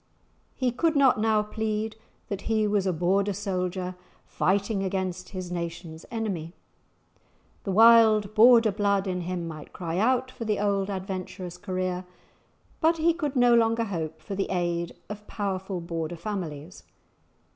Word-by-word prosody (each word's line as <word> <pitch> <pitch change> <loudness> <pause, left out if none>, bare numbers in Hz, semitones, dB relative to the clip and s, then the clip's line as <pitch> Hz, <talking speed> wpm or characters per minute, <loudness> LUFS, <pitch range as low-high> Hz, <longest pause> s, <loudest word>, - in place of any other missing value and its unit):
He 255 -2 0
could 320 +6 +1
not 270 -5 +4
now 215 -1 +2
plead 220 0 -3 0.3
that 200 +1 -5
he 220 -1 +2
was 205 -2 +1
a - - +2
Border 190 +4 +1
soldier, 185 -2 -3 0.3
fighting 200 +2 0
against 185 -1 -3
his 185 -2 -6
nation's 170 -1 -6
enemy. 190 -8 -4 1.1
The 195 - -1
wild 220 -1 +6
Border 230 0 +7
blood 200 -1 +1
in 180 -2 -2
him 175 -1 -3
might 155 -2 -9
cry 170 0 -3
out 255 +3 +2
for 230 - -7
the 215 -2 0
old 200 -1 0
adventurous 185 -2 -5
career, 185 -1 -2 0.8
but 330 +1 +3
he 330 +1 +3
could 300 -4 -3
no 245 -1 +5
longer 230 0 +3
hope 160 -6 -4
for 200 - -6
the 195 0 -2
aid 175 -2 -1
of 210 0 -8
powerful 190 -2 -3
Border 170 0 -4
families. 170 -5 -6
195 Hz, 145 wpm, -27 LUFS, 180-220 Hz, 1.1 s, Border